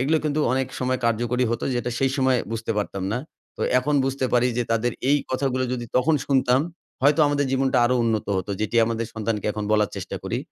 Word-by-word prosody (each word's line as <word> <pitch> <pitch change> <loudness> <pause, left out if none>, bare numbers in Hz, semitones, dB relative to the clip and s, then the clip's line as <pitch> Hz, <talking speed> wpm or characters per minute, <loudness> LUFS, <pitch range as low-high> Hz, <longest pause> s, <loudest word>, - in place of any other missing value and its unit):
এগুলো 150 +5 +2
কিন্তু 150 0 0
অনেক 130 0 +1
সময় 130 0 0
কার্যকরী 120 +2 +1
হতো 115 - -2
যেটা 120 0 -1
সেই 135 -1 +2
সময় 130 -2 +3
বুঝতে 115 0 -2
পারতাম 100 -2 -3
না। 120 - 0 0.4
তো - - -4 0.2
এখন 145 +3 0
বুঝতে 135 0 -1
পারি 125 0 +4
যে - - +2
তাদের 115 +1 +1 0.2
এই 145 - +5
কথাগুলো 130 -1 0
যদি 120 -1 -3
তখন 150 +5 +3
শুনতাম, 130 -1 +3 0.4
হয়তো 145 +3 +4
আমাদের 145 -1 +1
জীবনটা 135 -1 +2
আরো 125 +1 +2
উন্নত 110 -2 0
হত। 95 +1 -3
যেটি 110 +2 -1
আমাদের 115 0 -2
সন্তানকে 110 -1 -2
এখন 105 - -4
বলার 105 -1 +2
চেষ্টা - - -5
করি। - - -2
125 Hz, 205 wpm, -24 LUFS, 115-135 Hz, 0.4 s, এই